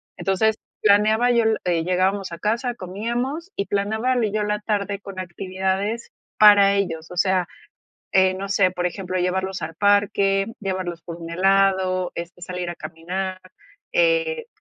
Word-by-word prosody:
Entonces, 215 +3 +1 0.3
planeaba 215 +3 +4
yo, 235 -1 +3
le 220 -1 +2
eh, 170 -2 +1
llegábamos 185 +1 0
a 170 - -7
casa, 235 +3 -1
comíamos, 240 - -4
y 200 - 0
planeaba 220 +5 0
y 210 - -2
yo 215 0 0
la 210 0 -1
tarde 205 -1 -2
con 195 -2 -8
actividades 190 +4 -3 0.3
para 205 -2 +7
ellos. 170 -4 -2
O 180 - -8
sea, 185 -1 +2 0.7
eh, 190 0 +4
no 195 +1 -5
sé, 195 -1 +3
por 180 -1 -2
ejemplo, 185 0 -3
llevarlos 190 +1 -1
al 160 +1 -5
parque, 200 0 +2
llevarlos 185 -4 -4
por 170 -1 -7
un 165 0 -8
helado, 190 0 +2
este, 170 +1 -7
salir 180 -1 -4
a 175 - -7
caminar, 185 +3 -5 0.5
eh, - - +2
195 Hz, 155 wpm, -22 LUFS, 185-210 Hz, 0.7 s, para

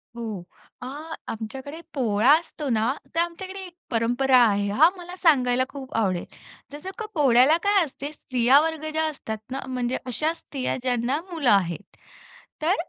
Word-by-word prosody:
हो, 220 -6 -5 0.4
अ, - - -6 0.4
आमच्याकडे 265 +8 -6
पोळा 235 -1 +3
असतो 320 -3 -8
ना 230 +2 +1 0.2
तर - - +2
आमच्याकडे 375 +3 -4
एक 350 - -13 0.2
परंपरा 245 +3 +3
आहे 200 -2 +1
हां. 290 +11 +6
मला 355 0 -9
सांगायला 255 -8 +3
खूप 270 -2 -9
आवडेल. 190 -6 0 0.5
जसं 295 +6 -7
का 445 - -4
पोळ्याला 270 +1 +5
काय 405 -2 +4
असते 285 -1 -6
स्त्रिया 255 -1 +3
वर्ग 320 -1 -2
ज्या 315 0 0
असतात 220 -7 -6
ना 270 - -2
म्हणजे 250 -1 -1
अशा 305 +6 0
स्त्रिया 275 -5 -4
ज्यांना 250 +2 0
मुलं 310 -7 +1
आहेत. 190 -2 0 0.7
तर 345 +5 +3
265 Hz, 155 wpm, -25 LUFS, 235-315 Hz, 0.7 s, हां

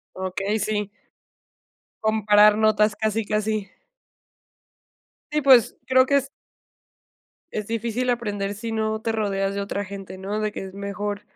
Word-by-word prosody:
Okey, 195 +3 -2
sí. 210 -1 -2 1.1
Comparar 210 -1 +5
notas 215 -1 +3
casi, 220 +1 -1
casi. 210 -1 -1 1.6
Y 300 0 +1
pues, 260 -5 +6
creo 260 0 +5
que 280 +1 +3
es. 275 0 -1 1.3
Es 210 -1 -3
difícil 230 +2 -2
aprender 205 -4 -2
si 225 +3 -5
no 220 0 -1
te 225 - -1
rodeas 200 -3 -1
de 200 - -2
otra 200 0 -3
gente, 195 -1 -8
¿no? 200 +3 -3
De 215 0 -1
que 205 - -6
es 190 - -10
mejor 200 +1 -4
210 Hz, 135 wpm, -24 LUFS, 200-220 Hz, 1.6 s, pues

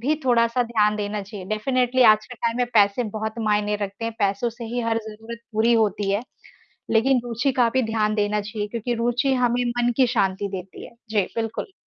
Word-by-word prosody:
भी 285 +6 +1
थोड़ा-सा 235 0 +3
ध्यान 215 -3 +1
देना 205 0 -3
चाहिए। 200 -1 -9
डेफ़िनेटली 250 +4 +1
आज 215 0 +2
के 250 - -9
टाइम 230 0 -2
में 245 -1 +1
पैसे 205 +3 +4
बहुत 220 0 -3
मायने 210 0 +1
रखते 205 +2 -5
हैं, 230 - -2
पैसों 200 +3 0
से 235 +1 -9
ही 240 +2 -3
हर 230 -1 0
ज़रूरत 225 +2 -9
पूरी 225 +2 +3
होती 210 -3 +1
है, 205 +3 0 0.7
लेकिन 245 +2 +3
रुचि 240 +3 0
का 235 - +4
भी 260 - +3
ध्यान 215 -1 0
देना 210 0 0
चाहिए 210 0 -4
क्योंकि 235 +2 -3
रुचि 240 +3 +1
हमें 245 -1 +1
मन 240 0 +1
की 260 -2 +5
शांति 200 -4 0
देती 190 -1 -8
है। - - -13 0.2
जी, 215 -2 +2
बिल्कुल। 225 - -3
225 Hz, 200 wpm, -23 LUFS, 210-240 Hz, 0.7 s, की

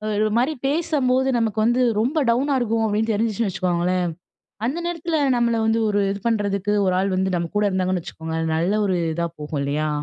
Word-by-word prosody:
ஒரு 215 +1 +2
மாரி 260 +6 +2
பேசும் 300 -2 0
போது 260 +1 +2
நமக்கு 225 -2 0
வந்து 240 +3 +2 0.2
ரொம்ப 255 +9 0
டவுனா 270 +4 +2
இருக்கும் 225 -2 0
அப்டின்னு 220 +2 0
தெரிஞ்சிருச்சுன்னு 220 0 0
வச்சுக்கோங்களேன், 180 -1 0 0.6
அந்த 275 +7 -2
நேரத்துல 335 -2 -2 0.2
நம்மள 235 -1 +2
வந்து 225 +1 +2
ஒரு 205 0 +1
இது 200 - -4
பண்றதுக்கு 205 -2 0
ஒரு 185 - +2
ஆள் 195 0 0
வந்து 190 0 0
நம்ம 170 -1 -3
கூட 210 - +2
இருந்தாங்கன்னு 185 -1 0
வச்சுக்கோங்க, 160 0 -6 0.2
நல்ல 170 +5 +1
ஒரு 185 -2 +1
இதா 170 +1 -1
போகும் 150 -1 -4
இல்லையா? 150 +2 -1
210 Hz, 185 wpm, -22 LUFS, 185-240 Hz, 0.6 s, ஒரு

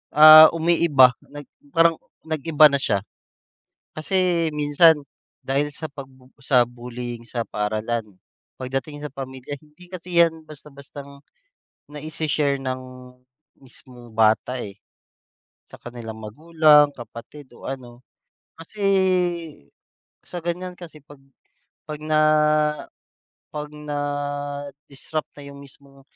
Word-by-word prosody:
ah, 155 +1 +11
umiiba 160 -6 +4 0.2
nag 145 0 -10 0.3
parang 165 0 +4 0.3
nag-iba 155 -1 +4
na 140 - +1
siya. 100 -6 -1 0.9
Kasi 175 0 0
minsan 150 +1 +4 0.4
dahil 140 +2 0
sa 155 - -6
pag 140 -2 -9 0.3
sa 130 -2 +3
bullying 120 0 -8
sa 115 -1 -3
paaralan, 110 0 -3 0.4
pagdating 135 +3 -5
sa 150 - -6
pamilya, 130 0 -8
hindi 155 +4 -18
kasi 180 -1 -2
yan 160 -1 -2
basta 150 0 -13
bastang 140 0 -12 0.7
naishe-share 150 -1 -2
ng 130 0 -3 0.8
mismong 125 -3 -16
bata, 110 +3 +2
eh. 100 0 -10 0.9
Sa - - -13
kanilang 115 -2 -9
magulang, 150 +4 +4
kapatid, 125 +4 -12
o 120 - -12
ano. 125 -3 -8 0.6
Kasi, 165 +6 -13 1.4
sa 175 -2 -9
ganyan 180 +1 -4
kasi 165 -4 -12
'pag 145 +1 -16
na 135 - -30 0.5
'pag 150 -1 -7
na 155 0 +1 1.3
'pag 150 0 -5
na-disrupt 145 0 -5
na - - -10
yung 140 0 -11
mismong 140 0 -17
145 Hz, 110 wpm, -22 LUFS, 130-155 Hz, 1.4 s, ah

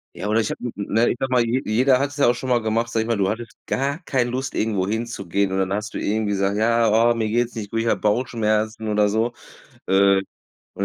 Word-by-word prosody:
Ja, - - -5
oder 110 +2 +2
ich 110 - -2
habe - - -7
n 120 - -4
ne, 110 +3 +1
ich - - -2
sage 130 -1 -2
mal, 125 -2 +4
je 120 +3 0
jeder 125 +5 +3
hat 140 +2 -1
es 145 - -11
ja 140 - +4
auch 120 - +3
schon 130 +2 -5
mal 120 -1 +3
gemacht, 115 +2 -1
sage 115 - +1
ich 110 - -3
mal 115 -2 0
du 95 - +1
hattest 115 +2 -6
gar 140 +2 -1
keine 125 -5 0
Lust, 130 +2 -3
irgendwo 105 -4 0
hinzugehen, 100 -4 -2
und 95 - -1
dann 95 0 0
hast 105 +1 -4
du - - -1
irgendwie 105 0 -1
gesagt: 100 0 0
„Ja, 115 +2 +2 0.2
oh, 120 - +1
mir 110 -1 -1
geht's 120 +2 0
nicht 105 -3 -6
gut, 115 - -1
ich 115 - -1
habe - - +1
Bauchschmerzen” 110 -1 0
oder 105 -1 +2
so, 115 +3 0 0.5
äh, 95 0 +4 0.5
und - - -2
110 Hz, 260 wpm, -22 LUFS, 105-120 Hz, 0.5 s, mal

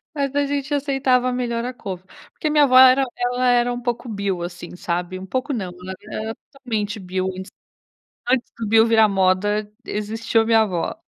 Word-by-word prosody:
Mas, 280 -2 -2
a 285 0 +2
gente 285 0 -2
aceitava 270 -3 +1
melhor 235 -2 -2
a 250 - -3
couve. 190 -7 -7 0.3
Porque 310 - -2
minha 300 -1 +5
avó 255 -2 +6
era 260 +1 +8
ela 245 +1 0
era 245 0 +3
um 245 - -4
pouco 240 0 -3
bio, 200 -4 -2
assim, 175 0 -7
sabe? 180 +1 -3
Um 185 - -8
pouco 260 +8 -2
não. 195 -6 -3
Na 180 +1 -8
verdade - - -20
ela - - -3
era - - -5 0.2
totalmente 220 -6 -4
bio, 185 0 -2 1.0
antes 250 -1 +1
do 225 -2 -4
bio 225 +1 +5
virar 225 -1 +5
moda, 205 +2 +1
existiu 225 +2 -1
minha 225 0 +4
a - - +5
avó. 180 -5 -2
225 Hz, 195 wpm, -21 LUFS, 195-255 Hz, 1.0 s, era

